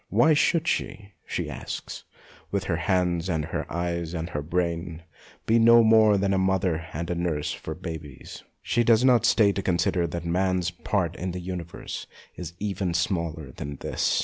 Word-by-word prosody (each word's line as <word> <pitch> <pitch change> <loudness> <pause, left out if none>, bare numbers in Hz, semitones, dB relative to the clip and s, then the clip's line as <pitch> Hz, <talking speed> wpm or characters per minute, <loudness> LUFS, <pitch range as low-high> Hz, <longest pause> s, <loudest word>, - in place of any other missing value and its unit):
Why 160 - +5
should 165 +2 +2
she, 100 -9 -2 0.2
she - - -2
asks, - - -6 0.4
with - - -1
her - - -1
hands 90 -1 0
and 80 -3 0
her 80 - -4
eyes 85 0 -2
and 85 +2 -4
her 75 - -2
brain, 85 +1 -2 0.4
be 115 +1 +4
no 115 +1 +7
more 110 -2 +6
than 100 0 +1
a 95 - +2
mother 95 -4 0
and 85 +3 -4
a - - +1
nurse 85 -4 -2
of 80 +4 -6
babies? 80 -6 -8 0.2
She 120 - +1
does 115 +1 +4
not 125 -3 +5
stay 105 -3 +4
to 100 - -2
consider 90 -1 +1
that 85 +1 -5
man's 90 0 +1
part 85 0 -1
in 90 0 -3
the 90 - -4
universe 90 -2 -6 0.3
is 85 -2 -7
even 95 -3 -2
smaller 85 -5 -1
than 70 +3 -6
this. - - 0
90 Hz, 175 wpm, -26 LUFS, 85-100 Hz, 0.4 s, no